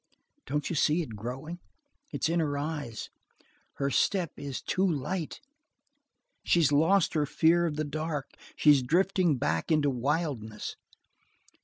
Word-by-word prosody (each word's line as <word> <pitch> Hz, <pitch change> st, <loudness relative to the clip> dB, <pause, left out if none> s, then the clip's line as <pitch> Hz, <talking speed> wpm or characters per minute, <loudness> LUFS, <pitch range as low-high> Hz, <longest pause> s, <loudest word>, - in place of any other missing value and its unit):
Don't 150 Hz, 0 st, -1 dB
you 170 Hz, -, -2 dB
see 155 Hz, +3 st, +2 dB
it 115 Hz, -8 st, -8 dB
growing? 135 Hz, +10 st, -6 dB, 0.5 s
It's -, -, -1 dB
in 170 Hz, +1 st, +1 dB
her 145 Hz, -3 st, 0 dB
eyes! 145 Hz, -6 st, -4 dB, 0.6 s
Her 140 Hz, 0 st, -1 dB
step 180 Hz, +3 st, +1 dB
is 140 Hz, -3 st, -5 dB
too 185 Hz, -, -1 dB
light. 165 Hz, +1 st, -3 dB, 1.0 s
She's 165 Hz, -5 st, +3 dB
lost 165 Hz, +6 st, +3 dB
her 150 Hz, -2 st, +1 dB
fear 170 Hz, +4 st, +3 dB
of 150 Hz, -, -3 dB
the 155 Hz, 0 st, -1 dB
dark. 150 Hz, -1 st, -4 dB, 0.2 s
She's 145 Hz, -3 st, +5 dB
drifting 175 Hz, +2 st, +2 dB
back 80 Hz, -, -1 dB
into 150 Hz, -3 st, +3 dB
wildness. 130 Hz, -5 st, -2 dB
150 Hz, 135 wpm, -29 LUFS, 140-165 Hz, 1.0 s, She's